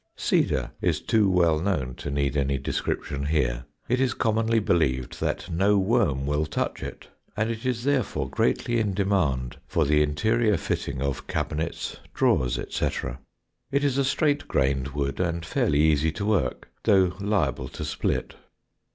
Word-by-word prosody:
Cedar - - +1
is - - +1
too 105 -3 +2
well 85 -4 +3
known 80 -9 -1
to - - -5
need 70 0 0
any 70 -1 +1
description 70 +1 -2
here. 60 -6 0 0.2
It 125 +2 +1
is 130 -3 +1
commonly 115 +1 +1
believed 75 - 0
that - - -1
no 100 +5 +3
worm 95 - +2
will 75 +2 0
touch - - -2
it, - - -8 0.3
and 110 +2 +1
it 115 +3 -4
is 120 -2 -1
therefore 135 -5 0
greatly 120 -1 +1
in 105 -4 0
demand 85 -11 0
for 80 - +1
the 75 +1 +3
interior 105 +8 +2
fitting 70 -3 -3
of 70 -1 -3
cabinets, 80 +2 -3 0.2
drawers, - - +2
etc. 60 - -3 0.5
It 140 +1 +1
is 140 -1 +1
a - - +3
straight 145 +1 +1
grained 65 0 +1
wood 70 -1 -3
and 85 -2 -1
fairly 75 -2 +1
easy 80 0 +3
to 100 - -4
work, 90 -13 0
though 95 -2 +4
liable 100 - 0
to - - -6
split. - - -2
85 Hz, 160 wpm, -26 LUFS, 70-110 Hz, 0.5 s, though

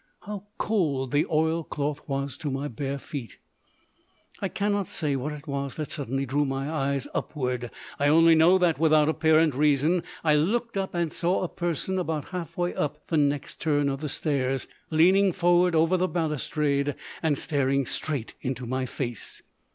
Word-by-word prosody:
How 205 -1 -7
cold 145 - 0
the 145 +3 +2
oilcloth 155 -2 -1
was 140 -1 -2
to 150 - -4
my 135 +2 -2
bare 140 +2 -3
feet. 135 -3 -7 1.0
I 195 - 0
cannot 205 -2 0
say 150 -4 -1
what 135 +3 -2
it 150 0 -8
was 140 -2 -3
that 155 -2 -4
suddenly 135 -1 -2
drew 140 +3 +1
my 135 0 -2
eyes 140 -3 -1
upwards. 125 -4 -2 0.3
I 145 - +3
only 165 +2 +6
know 165 +4 +6
that, 170 -6 +2
without 155 -1 +4
apparent 160 -1 +3
reason, 150 +5 +3 0.2
I 155 -2 +4
looked 225 +10 +1
up 195 -2 -2
and 170 -2 -1
saw 180 +2 +1
a - - 0
person 175 +2 -2
about 160 -5 -3
half 180 -4 -6
way 175 0 0
up 150 0 -3
the 165 - +1
next 145 -1 0
turn 145 -3 +2
of 135 +1 -3
the 150 - -3
stairs, 135 -3 -1 0.2
leaning 185 +5 +5
forward 175 0 +3
over 165 +3 +4
the 185 +1 +1
balustrade 150 -4 0 0.3
and 155 -4 +1
staring 140 -2 +1
straight 140 -2 -3
into 125 -1 -3
my 130 +2 -2
face. 120 -3 -5
150 Hz, 170 wpm, -26 LUFS, 140-170 Hz, 1.0 s, only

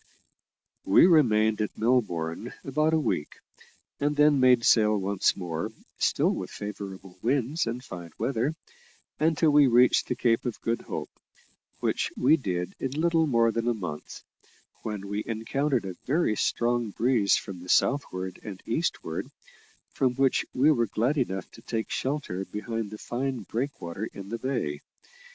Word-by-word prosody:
We 95 - +6
remained 110 - +4
at 105 - -3
Melbourne 110 -5 0
about 155 +3 +1
a - - +3
week, 75 - -2 0.6
and 145 +1 +1
then 150 -1 +5
made 125 -2 +5
sail 110 -2 +5
once 100 0 +1
more, 90 +2 -3 0.3
still - - +2
with - - -5
favourable 95 -2 -8
winds 135 +4 0
and 120 +2 -4
fine 90 -8 -8
weather, 135 +4 -1 0.6
until 160 0 +3
we 145 -1 +6
reached 125 +1 +4
the 125 - -1
Cape 115 -1 +2
of 120 -3 -4
Good 115 0 -1
Hope - - -5 0.7
which - - 0
we 140 +5 +5
did 90 - -3
in 135 +3 -3
little 165 -1 +3
more 115 -4 +3
than 115 +1 -2
a 120 - +2
month 90 -8 -7 0.6
when 105 -2 -5
we 100 +1 -2
encountered 120 +2 -1
a 95 - -4
very 140 -5 +2
strong 120 0 0
breeze 115 -1 +2
from 95 -3 -7
the 90 +1 -11
southward 95 -10 +1
and 95 -3 -8
eastward, 115 - -2 0.7
from 130 -2 +1
which 135 0 +2
we 140 +5 +4
were 120 -6 +2
glad 120 +8 0
enough 95 -7 -2
to - - -14
take 115 -1 -3
shelter 130 -9 -2
behind 110 +1 -4
the 105 - -8
fine 130 +2 -3
breakwater 110 -5 -4
in 100 0 -9
the 115 +1 -4
Bay. 100 - -2
115 Hz, 155 wpm, -27 LUFS, 100-135 Hz, 0.7 s, We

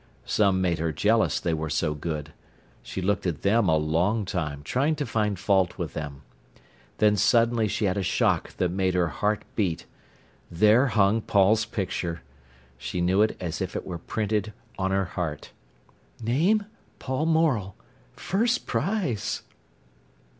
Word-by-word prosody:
Some 95 -3 +2
made 85 -3 0
her 80 0 0
jealous, 110 +9 +2
they 85 - -1
were 80 0 -2
so 75 +1 0
good. 75 -1 -5 0.5
She 95 - -6
looked 100 0 0
at 80 -5 -3
them 100 -1 +3
a 80 - +4
long 85 +8 +1
time 75 -6 -3
trying 140 - +1
to 145 -1 -3
find 105 -4 0
fault 95 -1 +1
with - - -4
them. 75 -2 -6 0.7
Then 105 -1 +4
suddenly 115 +2 +3
she 105 - -1
had 95 0 0
a - - +1
shock 95 - +1
that 90 -2 0
made 95 0 0
her 90 -2 +2
heart 105 +6 -1
beat. 95 -7 -1 0.6
There 105 +9 +4
hung 110 -1 +3
Paul's 105 +2 +3
picture! 90 - -3 0.6
She 90 - -4
knew 90 +3 +3
it 110 - +2
as 85 0 -4
if 95 - -3
it - - -4
were 85 -3 -5
printed 105 +2 -2 0.2
on 95 -1 -1
her 95 0 +1
heart. 85 -4 -5 0.7
"Name—Paul 155 - -1
Morel—First 165 - -1
Prize." 155 - -1
100 Hz, 145 wpm, -26 LUFS, 85-115 Hz, 0.7 s, a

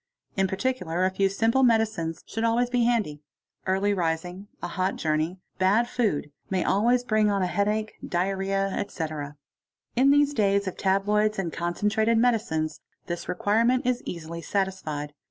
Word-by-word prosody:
In 195 0 +2
particular 190 -4 -1
a 190 - +1
few 195 +1 +2
simple 225 +6 +2
medicines 220 -9 +1
should 225 - -4
always 240 +2 +2
be 245 -2 +2
handy; 215 -12 0 0.5
early 195 +2 +2
rising, 180 +2 -2
a - - -4
hot 185 0 -1
journey, 155 +3 -1 0.2
bad 205 +6 +3
food, 210 -13 -1 0.2
may 185 -2 +1
always 240 +5 +2
bring 215 -3 +2
on 200 -2 +1
a - - +2
headache, 210 +3 0
"diarrhoea, 195 +2 0
etc. 155 -7 -4 0.6
In 260 +3 +5
these 290 0 +4
days 200 -4 +2
of 185 - -3
tabloids 210 +2 +1
and 175 -4 -2
concentrated 210 +6 +1
medicines 215 -10 +1 0.2
this 175 0 -5
requirement 225 +7 +2
is 250 -1 +1
éasily 170 0 -6
satisfied. 160 -8 -2
195 Hz, 150 wpm, -26 LUFS, 175-225 Hz, 0.6 s, In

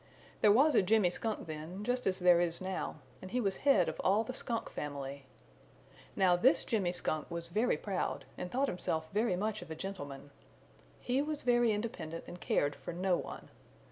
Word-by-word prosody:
There 210 - +7
was 280 +8 +5
a - - +6
Jimmy 195 -1 +3
Skunk 220 +4 -3
then, 160 +5 -6
just 245 +2 0
as 185 -1 +1
there 180 -2 +5
is 170 -1 0
now, 190 0 -3 0.3
and 185 - -8
he 250 - 0
was 195 -5 0
head 245 -11 +4
of - - -4
all 200 +4 +4
the 255 - -5
Skunk 235 -2 -3
family. 140 -2 -5 0.9
Now 185 -2 +4
this 255 - +4
Jimmy 200 -7 0
Skunk 155 -3 -2
was 170 -1 -5
very 215 +7 +2
proud 195 -3 -2
and 180 - -5
thought 270 +3 +1
himself 160 -5 -2
very 215 -2 +2
much 215 +2 -2
of 175 - -10
a 160 - -5
gentleman. 145 -7 -7 0.7
He 255 +2 0
was 300 0 -3
very 240 -2 +4
independent 205 -7 -4
and 175 - -9
cared 145 0 +1
for - - -7
no 180 +1 +1
one. - - -6
190 Hz, 190 wpm, -33 LUFS, 170-225 Hz, 0.9 s, There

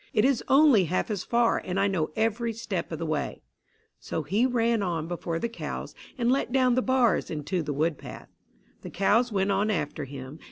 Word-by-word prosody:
"It 215 - +3
is 270 -3 +2
only 270 - +6
half 185 +6 -1
as 200 -3 -2
far, 235 -1 +2
and 185 +1 -2
I 200 - +3
know 175 -6 -1
every 230 +1 0
step 210 -6 -4
of 160 - -3
the 165 - -4
way." 155 -2 -3 0.6
So 160 - -4
he 205 - +2
ran 235 -3 +1
on 170 -4 -2
before 170 -1 -3
the 235 - -1
cows, 230 - -6 0.2
and 240 -1 +2
let 265 -2 0
down 255 -1 +3
the 255 - +2
bars 255 -6 +2
into 160 +4 -2
the 150 - -4
wood 150 +2 0
path. - - -10 0.5
The - - -8
cows 225 +5 +2
went 195 -1 +1
on 200 +2 +1
after 160 -6 -2
him. 135 +2 -9
200 Hz, 205 wpm, -27 LUFS, 165-235 Hz, 0.6 s, only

